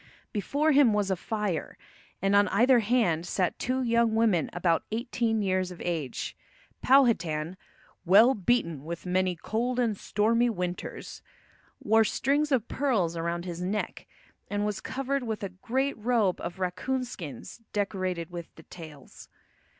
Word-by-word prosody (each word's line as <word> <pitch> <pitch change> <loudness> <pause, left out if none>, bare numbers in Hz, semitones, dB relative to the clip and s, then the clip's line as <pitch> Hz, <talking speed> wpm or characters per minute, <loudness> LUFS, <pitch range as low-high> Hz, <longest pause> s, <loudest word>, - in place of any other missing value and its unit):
Before 285 +9 +1
him 275 -6 +5
was 205 -2 0
a - - +2
fire, 205 -3 -3 0.5
and 195 +1 +3
on 205 0 +5
either 240 +6 +4
hand 210 -8 +1
sat 180 -2 -1
two 255 +1 -1
young 235 -2 +2
women 215 -9 +2
about 170 -1 +1
eighteen 230 -1 -1
years 185 -1 0
of 180 -2 -10
age. 160 -7 -3 0.5
Powhatan, 185 - +3 0.5
"well 210 +8 +6
beaten 180 - 0
with 170 +3 -6
many 185 0 +1
cold 240 +8 -2
and 230 -4 +1
stormy 230 +4 +1
winters," 180 -4 -5 0.6
wore 220 +1 +5
strings 285 +7 0
of 245 -4 +1
pearls 215 -12 0
around 170 +1 -2
his 175 -1 -5
neck, 200 +4 -3 0.4
and 205 0 -1
was 210 -2 -2
covered 270 +1 -2
with 220 -4 -4
a 200 - -2
great 250 +8 -2
robe 215 -5 +1
of 175 - -5
raccoon 250 +8 -2
skins 165 - -9
decorated 185 -4 -2
with 170 -1 -8
the 160 - -14
tails. 155 -6 -12
205 Hz, 145 wpm, -28 LUFS, 175-240 Hz, 0.6 s, well